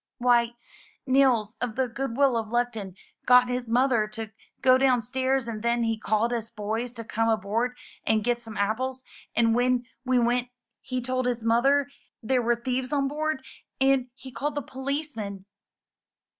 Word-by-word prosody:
"Why, 240 -1 +3 0.5
Nils 255 -5 +3
of 240 -3 -2
the 260 -1 +1
'Goodwill 265 +2 +1
of 225 -1 -1
Luckton* 225 -5 -2 0.3
got 250 0 +6
his 250 -1 -2
mother 240 -2 +2
to 215 0 -6 0.3
go 255 0 +6
down 255 -3 +3
stairs 260 +1 0
and 220 -2 -4
then 235 +1 +1
he 225 -1 +1
called 220 +2 0
us 230 -1 -3
boys 220 +3 -3
to 230 -2 -7
come 225 0 0
aboard 225 +3 0 0.3
and 220 -1 +2
get 240 +1 0
some 225 -2 -9
apples; 255 +6 -1 0.3
and 230 -1 +4
when 245 +1 +2 0.2
we 255 -1 +2
went 245 +1 +1 0.3
he 255 -1 -3
told 255 0 -1
his 240 -2 -1
mother 270 +5 +3 0.4
there 255 +2 +2
were 240 0 +2
thieves 250 +2 -3
on 280 -2 +1
board; 300 -1 -2 0.3
and 265 -1 +3
he 260 -1 -11
called 280 +5 -3
the 290 - -2
policeman." 265 -8 -4
245 Hz, 165 wpm, -26 LUFS, 225-260 Hz, 0.5 s, got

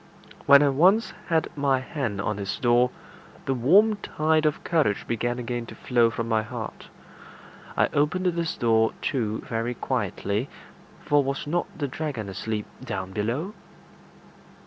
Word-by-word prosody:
When 140 +1 +8
I 145 - +4
once 185 - +3
had 165 0 0
my 140 -2 +2
hand 130 - -3
on 105 0 -2
his 100 -1 -3
door, 120 0 +3 0.6
the 135 - +1
warm 195 - +4
tide 155 -4 +1
of 150 - -2
courage 150 -12 +1
began 120 +1 -1
again 120 -1 -4
to - - -10
flow 120 -2 +2
from 115 0 -4
my 110 -1 +2
heart. 110 - -7 0.9
I - - +5
opened 150 +6 +1
this 170 -2 0
door 115 -1 +3
too 110 -5 -1
very 115 +2 -2
quietly, 105 -1 -2 0.6
for 145 -1 +4
was 135 0 -3
not 170 +4 -1
the 145 - -1
dragon 130 -7 -4
asleep 105 +2 -3 0.2
down 95 0 -4
below? 120 - -2
130 Hz, 145 wpm, -25 LUFS, 115-155 Hz, 0.9 s, When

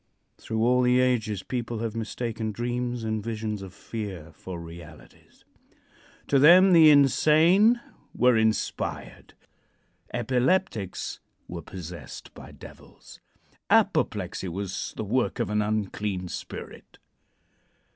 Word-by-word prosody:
Through 110 0 -2
all 125 +1 +3
the 125 0 +3
ages 115 -6 0
people 120 -2 -4
have 115 0 -4
mistaken 110 0 -4
dreams 120 +1 -3
and 110 -1 -2
visions 110 -2 -4
of 95 -1 -9
fear 95 -3 -7
for 90 -2 -8
realities. 85 -7 -14 0.8
To 140 - +2
them 180 +6 +7
the 160 -2 +8
insane 160 - +5 0.4
were 125 -1 +4
inspired; 110 -1 -2 0.8
epileptics 125 - -1 0.3
were 85 -1 -6
possessed 85 +1 -9
by - - -12
devils; - - -15 0.5
apoplexy - - +1
was 95 +2 -5
the - - -3
work 125 +5 0
of 115 -3 -2
an 105 0 +1
unclean 105 -3 -2
spirit. - - -9
110 Hz, 110 wpm, -26 LUFS, 100-125 Hz, 0.8 s, the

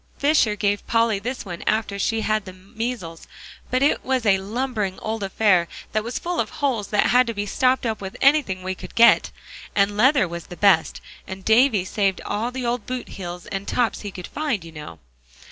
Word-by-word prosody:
Fisher 280 -7 +3
gave 205 -1 -1
Polly 230 -3 +2
this 245 +3 -5
one 175 -3 -7
after 215 -2 0
she 225 +2 0
had 215 -2 0
the 185 - -9
measles; 190 -2 -6 0.4
but 255 +2 +1
it 285 - +2
was 260 -3 0
a 195 -2 +4
lumbering 215 -1 -3
old 220 0 -4
affair 195 -3 +2 0.2
that 215 0 0
was 235 +2 -4
full 350 0 -3
of - - 0
holes 260 -8 -1
that 210 - +2
had 250 0 +5
to 230 - -3
be 205 0 -2
stopped 255 +5 +1
up 220 -2 -2
with 190 -1 -7
anything 270 -10 +3
we 185 0 -2
could - - -11
get. 235 0 +6 0.5
And 200 0 +2
leather 260 0 +4
was 170 0 -7
the 175 - -10
best; 190 -6 +3 0.3
and 190 0 -8
Davie 220 -4 +4
saved 195 -1 0
all 215 +4 -2
the 250 0 -5
old 240 -2 -2
boot 255 -1 -4
heels 180 -2 -7
and 195 0 -5
tops 240 -2 0
he 205 - -5
could 180 -2 -8
find, 285 - -3
you 165 - -10
know." 150 - -9
215 Hz, 205 wpm, -23 LUFS, 190-245 Hz, 0.5 s, get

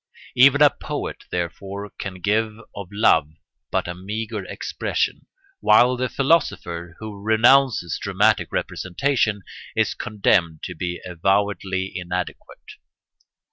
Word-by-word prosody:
Even 140 +3 +6
a 145 - +7
poet, - - -6
therefore, 95 +4 -4
can 100 -2 -5
give 110 +2 0 0.2
of 100 -2 -6
love 80 -7 +3 0.4
but - - -1
a 90 - -3
meagre 105 +5 -5
expression, - - -2 0.3
while 125 +1 +5
the 125 0 -2
philosopher, 85 - 0
who 105 -2 -8
renounces 110 - +3
dramatic - - +2
representation, 105 +1 -1 0.3
is - - +1
condemned 85 -6 0
to 90 - -5
be 90 +1 -4
avowedly 95 +1 0
inadequate. 90 -1 -5
100 Hz, 110 wpm, -22 LUFS, 90-115 Hz, 0.4 s, a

